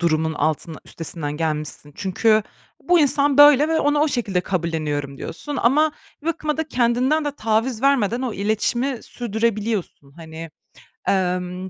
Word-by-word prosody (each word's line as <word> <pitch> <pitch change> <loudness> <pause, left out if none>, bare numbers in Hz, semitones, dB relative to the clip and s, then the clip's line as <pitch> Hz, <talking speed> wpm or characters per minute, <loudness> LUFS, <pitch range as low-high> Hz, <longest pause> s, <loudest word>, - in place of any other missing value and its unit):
durumun 160 -2 +1
altında 155 +1 -2
üstesinden 160 -2 -4
gelmişsin. 150 -2 -4
Çünkü, 215 +3 +2 0.4
"Bu 355 0 +3
insan 285 -1 +2
böyle 290 0 +7
ve 320 0 +1
onu 290 +1 +2
o 310 - +3
şekilde 210 -9 -1
kabulleniyorum." 155 -6 -3
diyorsun. 290 - -6
Ama 300 +6 +3 0.3
bir - - -11
bakıma 310 -2 -1
da 320 -1 -3
kendinden 255 +5 +1
de 290 - 0
taviz 225 +1 0
vermeden 250 -4 +2
o 250 -3 -2
iletişimi 220 +6 -1
sürdürebiliyorsun. 220 - -3
Hani, 160 0 -9 0.6
emm, 180 0 -1
220 Hz, 140 wpm, -21 LUFS, 165-275 Hz, 0.6 s, böyle